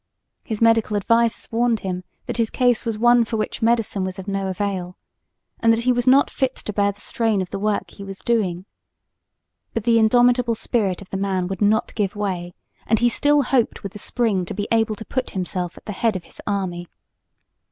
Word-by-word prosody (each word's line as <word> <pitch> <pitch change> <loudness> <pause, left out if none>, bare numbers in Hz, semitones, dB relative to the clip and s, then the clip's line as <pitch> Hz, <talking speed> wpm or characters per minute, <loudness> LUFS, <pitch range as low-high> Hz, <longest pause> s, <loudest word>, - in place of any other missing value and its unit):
His 220 0 -2
medical 225 -2 +3
advisers 230 +3 +1
warned 230 -1 +1
him 185 -1 -4 0.2
that - - -4
his 230 -2 +1
case 245 -2 +1
was 225 -2 -1
one 240 +1 +5
for 225 0 -3
which 215 - -3
medicine 225 -4 +1
was 185 0 -4
of 190 +1 -8
no 195 -1 -1
avail, 185 -1 -3 0.6
and 230 - +4
that 225 +1 +1
he 250 - +3
was 245 0 0
not 270 +2 +5
fit 265 -2 -1
to 210 - -6
bear 200 0 +2
the 200 - -19
strain 220 -1 0
of 185 -1 -4
the - - -3
work 210 0 -1
he 200 - -10
was 195 -1 -7
doing. 195 -7 -1 1.1
But 230 - -1
the 230 0 +4
indomitable 245 +1 +4
spirit 200 -5 -1
of 185 - -21
the 195 - -2
man 190 -2 -1
would 195 0 -5
not 210 +2 +2
give 205 -2 -1
way, 180 -4 -3 0.3
and 220 - +3
he 240 +2 +3
still 290 +4 +3
hoped 250 -3 0
with 200 - -6
the 210 - -9
spring 215 -5 0
to - - -6
be 205 +1 -3
able 225 -1 +2
to 220 - -9
put 255 -1 -2
himself 180 -1 -3
at - - -14
the - - -4
head 215 +1 0
of 185 - -4
his - - -14
army. 185 -4 -2
215 Hz, 215 wpm, -22 LUFS, 195-235 Hz, 1.1 s, one